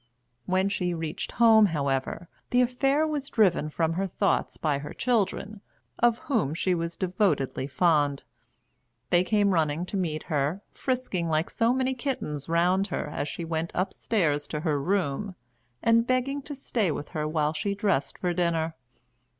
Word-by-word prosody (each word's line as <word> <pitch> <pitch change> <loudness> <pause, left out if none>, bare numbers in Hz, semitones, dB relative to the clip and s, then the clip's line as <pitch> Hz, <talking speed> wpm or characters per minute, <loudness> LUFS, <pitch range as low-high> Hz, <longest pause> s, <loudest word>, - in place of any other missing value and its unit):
When 185 +1 +2
she 180 -3 -1
reached 160 -1 -4
home, 220 -2 +6
however, 140 +1 -2 0.2
the 250 - +4
affair 270 +5 +2
was 295 -3 -3
driven 180 -8 +2
from 165 +1 0
her 195 +3 -1
thoughts - - 0
by 145 -3 0
her 145 - -8
children, 215 -3 -1 0.4
of 235 -1 +4
whom 160 - -1
she 185 +2 +1
was 170 -1 -3
devotedly 180 -8 0
fond. 145 -2 +2 0.9
They 175 0 +5
came 205 0 +2
running 160 0 +1
to 200 - -4
meet 155 -5 -2
her, 155 +5 -1
frisking 250 -10 -2
like 155 +2 0
so 230 0 +2
many 260 +1 +1
kittens 240 - -4
round 180 +4 +2
her 180 - -3
as 145 - -3
she 170 - -5
went 165 0 -2
upstairs 170 -5 0
to 150 - -4
her 150 -3 0
room, 185 +2 -1 0.5
and 230 +1 +4
begging 255 +3 0
to 290 - -4
stay 230 -7 -1
with 145 -1 -4
her 155 -3 -2
while 155 -1 0
she 200 +5 -2
dressed 195 -8 0
for 180 -1 -1
dinner. 165 -2 0
180 Hz, 160 wpm, -27 LUFS, 155-220 Hz, 0.9 s, home